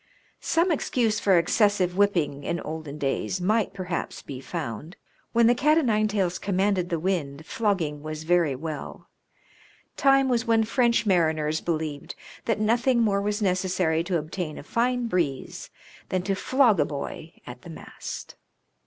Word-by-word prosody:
Some 340 Hz, +2 st, +1 dB
excuse 235 Hz, -7 st, 0 dB
for 190 Hz, -3 st, +4 dB
excessive 185 Hz, +1 st, +2 dB
whipping 170 Hz, -8 st, +1 dB
in 170 Hz, -, -2 dB
olden 155 Hz, -2 st, -6 dB
days 145 Hz, +6 st, -1 dB
might 210 Hz, +4 st, +1 dB
perhaps 185 Hz, -3 st, -4 dB
be 135 Hz, -2 st, -7 dB
found. 150 Hz, -, -6 dB, 0.4 s
When 235 Hz, 0 st, +4 dB
the 240 Hz, -, +6 dB
cat 300 Hz, +6 st, +3 dB
o' -, -, +5 dB
nine 215 Hz, -5 st, +2 dB
tails 190 Hz, -4 st, -1 dB
com 195 Hz, -2 st, -2 dB
manded 190 Hz, -2 st, +1 dB
the 170 Hz, -, 0 dB
wind 155 Hz, -4 st, -2 dB
flogging 175 Hz, -10 st, -1 dB
was 155 Hz, 0 st, -6 dB
very 165 Hz, -4 st, +2 dB
well. 155 Hz, +2 st, -7 dB, 0.9 s
Time 270 Hz, -1 st, +4 dB
was 240 Hz, -3 st, +1 dB
when 225 Hz, -1 st, +4 dB
French 235 Hz, +1 st, +2 dB
mariners 160 Hz, -5 st, +1 dB
believed 155 Hz, -4 st, -3 dB, 0.3 s
that 225 Hz, -2 st, 0 dB
nothing 235 Hz, +3 st, +2 dB
more 200 Hz, -2 st, +2 dB
was 210 Hz, +1 st, -1 dB
necessary 180 Hz, -3 st, +1 dB
to 180 Hz, -1 st, 0 dB
obtain 155 Hz, +1 st, -5 dB
a -, -, -8 dB
fine 245 Hz, +7 st, 0 dB
breeze 165 Hz, -, -2 dB, 0.4 s
than 185 Hz, -1 st, -1 dB
to 195 Hz, -, 0 dB
flog 235 Hz, 0 st, +3 dB
a 145 Hz, -, +4 dB
boy 150 Hz, +2 st, -6 dB
at 125 Hz, 0 st, -9 dB
the -, -, -12 dB
mast. 160 Hz, -, -8 dB
185 Hz, 160 wpm, -26 LUFS, 155-220 Hz, 0.9 s, the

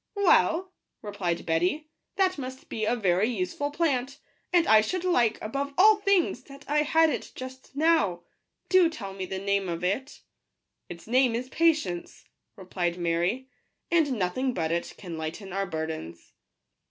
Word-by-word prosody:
" -, -, -55 dB
Well," 375 Hz, -2 st, +3 dB, 0.3 s
replied 200 Hz, -5 st, -3 dB
Betty, 180 Hz, -, 0 dB
" -, -, -55 dB
that 370 Hz, -4 st, +2 dB
must 260 Hz, 0 st, -8 dB
be 220 Hz, -, -2 dB
a 235 Hz, -, +1 dB
very 195 Hz, -1 st, +2 dB
useful 225 Hz, +6 st, -2 dB
plant, 280 Hz, -3 st, -1 dB, 0.3 s
and 350 Hz, -2 st, +4 dB
I 220 Hz, -1 st, +6 dB
should 365 Hz, +11 st, -2 dB
like, 240 Hz, -12 st, +2 dB
above 275 Hz, +5 st, -3 dB
all 425 Hz, +3 st, +7 dB
things, 400 Hz, -3 st, +1 dB
that 275 Hz, 0 st, -13 dB
I 295 Hz, +1 st, +2 dB
had 320 Hz, +1 st, +3 dB
it -, -, -5 dB
just 260 Hz, +1 st, -10 dB
now; 280 Hz, -, +2 dB, 0.4 s
do 370 Hz, -3 st, +5 dB
tell 205 Hz, -12 st, -7 dB
me 190 Hz, -1 st, -5 dB
the 190 Hz, -, -4 dB
name 200 Hz, -1 st, 0 dB
of 170 Hz, 0 st, -4 dB
it." 255 Hz, +10 st, -2 dB, 0.3 s
" -, -, -55 dB
Its 170 Hz, -1 st, -9 dB
name 250 Hz, 0 st, +3 dB
is 250 Hz, +2 st, -4 dB
pa~ 330 Hz, +5 st, 0 dB
tience 200 Hz, -, 0 dB, 0.2 s
," -, -, -55 dB
replied 180 Hz, -3 st, -3 dB
Mary; 175 Hz, +9 st, -1 dB, 0.2 s
" -, -, -51 dB
and 320 Hz, -5 st, +3 dB
nothing 245 Hz, +5 st, -1 dB
but 160 Hz, -2 st, -1 dB
it 170 Hz, 0 st, -2 dB
can 170 Hz, -5 st, -7 dB
lighten 180 Hz, +5 st, -6 dB
our 195 Hz, 0 st, -1 dB
burdens." 160 Hz, -, -6 dB
235 Hz, 180 wpm, -27 LUFS, 180-300 Hz, 0.4 s, all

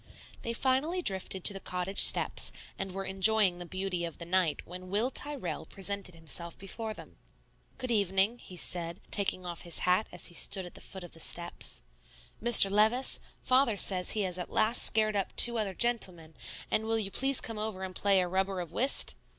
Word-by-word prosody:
They 230 Hz, -, -4 dB
finally 275 Hz, +9 st, -1 dB
drifted 190 Hz, -, 0 dB
to -, -, +7 dB
the 195 Hz, -, -7 dB
cottage 185 Hz, +1 st, -2 dB
steps, -, -, +1 dB, 0.3 s
and 195 Hz, -1 st, -4 dB
were 195 Hz, +1 st, -6 dB
enjoying 190 Hz, -1 st, +4 dB
the 175 Hz, -, -9 dB
beauty 185 Hz, -1 st, -4 dB
of 170 Hz, -1 st, -6 dB
the 170 Hz, -, -9 dB
night 175 Hz, -3 st, -1 dB
when 180 Hz, +1 st, -10 dB
Will 215 Hz, +7 st, 0 dB
Tyrrell 265 Hz, -, -3 dB
presented 195 Hz, -2 st, -5 dB
himself 165 Hz, +1 st, -6 dB
before 215 Hz, +3 st, -7 dB
them. -, -, -14 dB, 0.6 s
"Good 255 Hz, -2 st, -4 dB
evening," 200 Hz, +2 st, +1 dB
he 180 Hz, -, -13 dB
said, 170 Hz, -1 st, -2 dB
taking 195 Hz, -2 st, -1 dB
off 175 Hz, -1 st, -6 dB
his 170 Hz, -2 st, -2 dB
hat 185 Hz, +4 st, +1 dB
as 180 Hz, -, -7 dB
he 175 Hz, -, -2 dB
stood 190 Hz, +2 st, +1 dB
at 175 Hz, -, -12 dB
the -, -, -13 dB
foot 190 Hz, -1 st, -10 dB
of 175 Hz, -, -11 dB
the 165 Hz, -, -14 dB
steps. 170 Hz, -, -2 dB, 0.6 s
"Mr. 220 Hz, -4 st, +7 dB
Levice, 220 Hz, +6 st, +2 dB, 0.2 s
Father 255 Hz, -4 st, +2 dB
says 185 Hz, -2 st, +4 dB
he 215 Hz, -, -1 dB
has 185 Hz, -2 st, -2 dB
at 180 Hz, -, -6 dB
last 220 Hz, +2 st, +2 dB
scared 215 Hz, -1 st, +3 dB
up 195 Hz, -2 st, -3 dB
two 235 Hz, -1 st, +8 dB
other 195 Hz, -3 st, -3 dB
gentlemen; 185 Hz, -9 st, +1 dB, 0.4 s
and 220 Hz, -, 0 dB
will 225 Hz, 0 st, 0 dB
you 200 Hz, -3 st, -2 dB
please 270 Hz, +3 st, +1 dB
come 225 Hz, -2 st, -5 dB
over 210 Hz, -3 st, -5 dB
and 185 Hz, -1 st, -6 dB
play 200 Hz, -2 st, +2 dB
a 180 Hz, -, -2 dB
rubber 190 Hz, +1 st, -2 dB
of 170 Hz, -2 st, -7 dB
whist?" 265 Hz, +9 st, +1 dB
195 Hz, 200 wpm, -29 LUFS, 180-220 Hz, 0.6 s, two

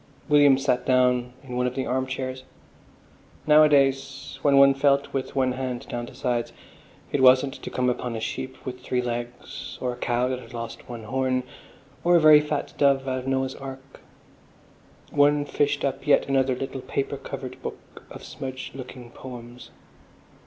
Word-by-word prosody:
William 145 Hz, -2 st, +6 dB
sat 125 Hz, -2 st, 0 dB
down 125 Hz, -1 st, +2 dB
in 125 Hz, -2 st, -7 dB
one 125 Hz, 0 st, +1 dB
of 125 Hz, -, -4 dB
the 135 Hz, -, -2 dB
arm 130 Hz, +1 st, -1 dB
chairs. 130 Hz, 0 st, -4 dB, 1.0 s
Nowadays, 140 Hz, -3 st, +3 dB
when 140 Hz, -1 st, +4 dB
one 140 Hz, 0 st, +7 dB
felt 140 Hz, 0 st, +2 dB
with 135 Hz, -1 st, -3 dB
one 130 Hz, -1 st, +2 dB
hand 125 Hz, -1 st, -4 dB
down 120 Hz, 0 st, -4 dB
the -, -, -13 dB
sides, 120 Hz, -2 st, -2 dB, 0.6 s
it 140 Hz, -, 0 dB
wasn't 130 Hz, +1 st, +6 dB
to -, -, -6 dB
come 125 Hz, 0 st, -1 dB
upon 125 Hz, -1 st, -2 dB
a -, -, -3 dB
sheep 130 Hz, +3 st, -5 dB
with 125 Hz, -1 st, -5 dB
three 125 Hz, 0 st, -1 dB
legs 120 Hz, 0 st, -6 dB
or 125 Hz, -1 st, -2 dB
a -, -, -11 dB
cow 120 Hz, 0 st, 0 dB
that 130 Hz, -1 st, -2 dB
had 125 Hz, -, -12 dB
lost 115 Hz, +1 st, -7 dB
one 120 Hz, -2 st, -7 dB
horn, 130 Hz, +2 st, 0 dB, 0.6 s
or 175 Hz, 0 st, +4 dB
a -, -, +7 dB
very 155 Hz, -1 st, +8 dB
fat 150 Hz, -1 st, -3 dB
dove 140 Hz, -1 st, +3 dB
out 130 Hz, 0 st, -1 dB
of -, -, -8 dB
the -, -, -2 dB
Noah's 130 Hz, 0 st, 0 dB
Ark. 135 Hz, 0 st, -10 dB, 1.1 s
One 145 Hz, 0 st, +3 dB
fished 145 Hz, 0 st, 0 dB
up 135 Hz, +1 st, -3 dB
yet 145 Hz, -, +4 dB
another 135 Hz, -1 st, +2 dB
little 135 Hz, +1 st, -5 dB
paper 135 Hz, -, -3 dB
covered -, -, -7 dB
book -, -, -9 dB
of -, -, -10 dB
smudged 130 Hz, -1 st, -7 dB
looking 125 Hz, -2 st, -9 dB
poems.... 120 Hz, -1 st, -10 dB
130 Hz, 175 wpm, -25 LUFS, 125-140 Hz, 1.1 s, very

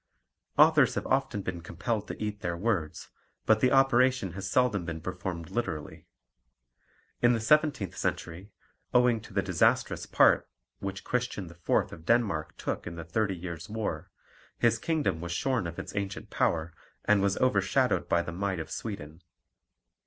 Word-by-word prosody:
Authors 150 Hz, -3 st, +6 dB
have -, -, -2 dB
often 130 Hz, -6 st, 0 dB
been 90 Hz, -2 st, -4 dB
compelled 110 Hz, +6 st, -3 dB
to -, -, -7 dB
eat 105 Hz, -1 st, -3 dB
their 85 Hz, -1 st, -2 dB
words, 90 Hz, -6 st, -2 dB, 0.4 s
but 110 Hz, 0 st, +4 dB
the 125 Hz, -, +5 dB
operation 130 Hz, -6 st, +4 dB
has 100 Hz, +3 st, -5 dB
seldom 110 Hz, -5 st, +2 dB
been 85 Hz, -1 st, -5 dB
performed 90 Hz, -1 st, -5 dB
literally. 80 Hz, -11 st, -4 dB, 1.1 s
In 120 Hz, 0 st, +5 dB
the 115 Hz, -, 0 dB
seventeenth 140 Hz, -, +2 dB
century, 90 Hz, +5 st, -3 dB, 0.4 s
owing 125 Hz, -2 st, +4 dB
to 110 Hz, -, -13 dB
the 100 Hz, 0 st, 0 dB
disastrous 90 Hz, -4 st, +1 dB
part -, -, +4 dB, 0.3 s
which 95 Hz, -1 st, -5 dB
Christian 120 Hz, -6 st, -2 dB
IV. 85 Hz, 0 st, -20 dB, 0.2 s
of 80 Hz, -, -11 dB
Denmark 110 Hz, -9 st, +1 dB
took -, -, -4 dB
in 85 Hz, -, -6 dB
the 85 Hz, -1 st, -7 dB
Thirty 100 Hz, +3 st, 0 dB
Years' 85 Hz, +1 st, -7 dB
War, 95 Hz, -5 st, -3 dB, 0.5 s
his -, -, +2 dB
kingdom 155 Hz, -, 0 dB
was 85 Hz, 0 st, -4 dB
shorn 125 Hz, -1 st, 0 dB
of 85 Hz, -, -7 dB
its -, -, -7 dB
ancient 100 Hz, -1 st, -4 dB
power 80 Hz, 0 st, 0 dB, 0.3 s
and 105 Hz, -2 st, +4 dB
was 100 Hz, 0 st, +1 dB
overshadowed 130 Hz, +2 st, +2 dB
by 85 Hz, -, +3 dB
the 85 Hz, -, -6 dB
might 95 Hz, 0 st, -2 dB
of 80 Hz, -, -6 dB
Sweden. 85 Hz, -7 st, -6 dB
100 Hz, 160 wpm, -29 LUFS, 85-120 Hz, 1.1 s, Authors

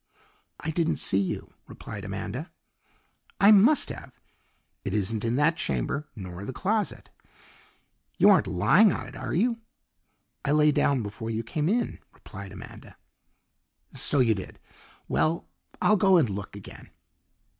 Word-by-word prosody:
"I 160 Hz, -, -3 dB
didn't 165 Hz, 0 st, 0 dB
see 95 Hz, -, +2 dB
you," 95 Hz, -, -3 dB
replied -, -, -9 dB
Amanda. -, -, -5 dB, 0.9 s
"I 200 Hz, -, +7 dB
must 220 Hz, +8 st, +5 dB
have. -, -, -10 dB, 0.6 s
It 100 Hz, -, -3 dB
isn't 105 Hz, +1 st, -1 dB
in 115 Hz, +1 st, 0 dB
that 155 Hz, +4 st, +2 dB
chamber, 140 Hz, -, -2 dB
nor 90 Hz, -2 st, -8 dB
the 115 Hz, -, -5 dB
closet. 205 Hz, -, -2 dB, 1.1 s
You -, -, +7 dB
aren't -, -, +4 dB
lying 185 Hz, -, +4 dB
on -, -, -4 dB
it, -, -, -11 dB
are -, -, -4 dB
you?" 230 Hz, +6 st, +1 dB, 0.8 s
"I 145 Hz, -, +1 dB
lay 150 Hz, 0 st, +5 dB
down 140 Hz, -3 st, +1 dB
before 105 Hz, +2 st, -6 dB
you 115 Hz, 0 st, -2 dB
came 150 Hz, +7 st, -2 dB
in," 235 Hz, +4 st, -1 dB, 0.2 s
replied -, -, -10 dB
Amanda. -, -, -12 dB, 1.0 s
"So 145 Hz, -, +3 dB
you 115 Hz, -3 st, +4 dB
did. 95 Hz, -3 st, -8 dB, 0.5 s
Well, 165 Hz, +2 st, 0 dB, 0.3 s
I'll 215 Hz, -, +4 dB
go 190 Hz, -1 st, +5 dB
and 160 Hz, -, +3 dB
look 100 Hz, 0 st, -6 dB
again." 100 Hz, -, -12 dB
145 Hz, 145 wpm, -27 LUFS, -, 1.1 s, I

